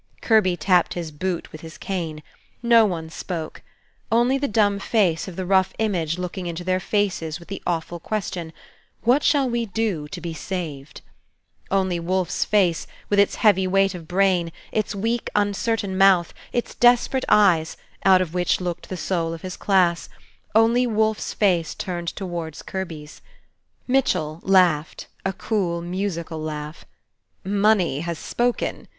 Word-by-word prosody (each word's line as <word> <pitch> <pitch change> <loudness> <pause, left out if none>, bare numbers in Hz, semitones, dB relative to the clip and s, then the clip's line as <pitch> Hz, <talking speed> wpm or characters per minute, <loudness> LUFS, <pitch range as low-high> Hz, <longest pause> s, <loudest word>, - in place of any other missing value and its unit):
Kirby 210 -6 +3
tapped 180 +2 +2
his 170 -3 -4
boot 175 +3 -3
with 155 - -10
his 160 -1 -10
cane. 165 -5 -4 0.4
No 235 -1 +6
one 165 -4 -4
spoke. 165 -2 -5 0.5
Only 240 +4 +3
the 285 - 0
dumb 205 -3 +2
face 195 -7 +1
of 185 - -7
the 185 - -4
rough 190 0 +3
image 175 -7 0
looking 180 0 -4
into 170 +1 -5
their 185 +1 +1
faces 185 -5 -1
with 170 - -15
the 195 - -5
awful 170 0 -2
question, 180 -5 -4 0.5
"What 250 +5 +4
shall 280 -3 +3
we 235 -1 -1
do 195 -7 -2
to - - -7
be 170 -2 -5
saved?" 155 -4 -6 0.7
Only 190 -3 +1
Wolfe's 180 +1 -1
face, 185 -6 +2 0.2
with 205 - +3
its 200 - +3
heavy 190 -3 +5
weight 195 +1 +2
of 170 -3 -9
brain, 180 -2 +2 0.2
its 215 -1 -1
weak, 225 +4 -1
uncertain 205 0 0
mouth, 190 -3 +4 0.2
its 240 - -2
desperate 245 +2 +3
eyes, 180 -6 +4 0.3
out 185 -1 +6
of 170 -2 -9
which 180 -1 +1
looked 175 -2 -4
the 185 - -4
soul 165 -3 -1
of 165 - -12
his 185 0 -5
class, 180 -4 +2 0.5
only 230 +3 +4
Wolfe's 220 -1 0
face 175 -6 +1
turned 175 -2 -4
towards 170 -4 -5
Kirby's. 165 -6 -6 0.7
Mitchell 180 - +1
laughed, 180 -5 +2 0.2
a 190 - 0
cool, 185 -4 -1
musical 170 -2 -4
laugh. 150 0 -6 0.6
"Money 200 -6 +2
has 170 +1 -3
spoken!" 240 +9 -2
185 Hz, 150 wpm, -23 LUFS, 170-205 Hz, 0.7 s, No